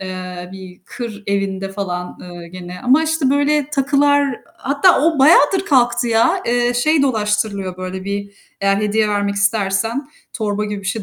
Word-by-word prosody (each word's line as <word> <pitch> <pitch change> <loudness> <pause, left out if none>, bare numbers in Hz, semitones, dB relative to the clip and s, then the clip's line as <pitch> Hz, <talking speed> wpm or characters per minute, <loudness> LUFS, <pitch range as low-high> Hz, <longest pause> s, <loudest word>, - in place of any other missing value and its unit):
eee, 185 -1 -7
bir 185 -2 -11
kır 220 -2 -7
evinde 195 -1 -2
falan, 180 -3 -5
eee, 175 -1 -10
gene 180 0 -9
ama 265 +5 +4
işte 315 -4 0
böyle 285 0 +1
takılar 285 -1 +2 0.2
hatta 285 +6 +3
o 320 0 +2
bayağıdır 325 +7 +5
kalktı 240 -4 +2
ya. 330 +12 +2
Eee, 245 0 +1
şey 300 +5 +2
dolaştırılıyor, 210 -6 -1
böyle 185 0 -6
bir 200 0 -4 0.3
eğer 195 0 +2
hediye 210 +1 +1
vermek 205 -1 -1
istersen, 205 +6 0 0.2
torba 210 -2 -2
gibi 210 -1 -4
bir 195 - -9
şey 210 +2 -2
210 Hz, 160 wpm, -18 LUFS, 195-275 Hz, 0.3 s, bayağıdır